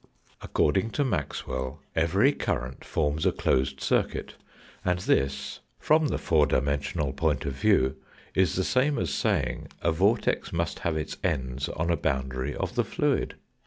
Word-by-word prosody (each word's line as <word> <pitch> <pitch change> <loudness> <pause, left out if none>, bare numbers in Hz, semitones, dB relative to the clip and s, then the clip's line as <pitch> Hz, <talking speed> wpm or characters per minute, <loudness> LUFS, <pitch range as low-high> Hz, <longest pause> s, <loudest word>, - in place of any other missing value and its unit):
According 95 +9 +1
to 145 - +2
Maxwell 75 - -3 0.2
every 95 - +4
current 65 - -3
forms 75 0 0
a - - +4
closed 65 0 0
circuit, - - 0 0.5
and 90 -1 +1
this, 70 -6 0 0.2
from 155 0 +3
the - - -1
four 75 -4 +3
dimensional 70 +1 0
point 75 -1 0
of 70 - -2
view, 70 -6 +2 0.4
is 95 -1 +2
the 95 - +1
same 135 +7 +2
as - - -1
saying - - 0
a 85 - +1
vortex 100 +8 +1
must 85 0 -2
have 80 -2 -1
its 75 - -4
ends 65 +2 -1
on 85 +1 -1
a 85 - +2
boundary 65 -1 -2
of - - -3
the - - +2
fluid. - - 0
80 Hz, 155 wpm, -27 LUFS, 65-90 Hz, 0.5 s, every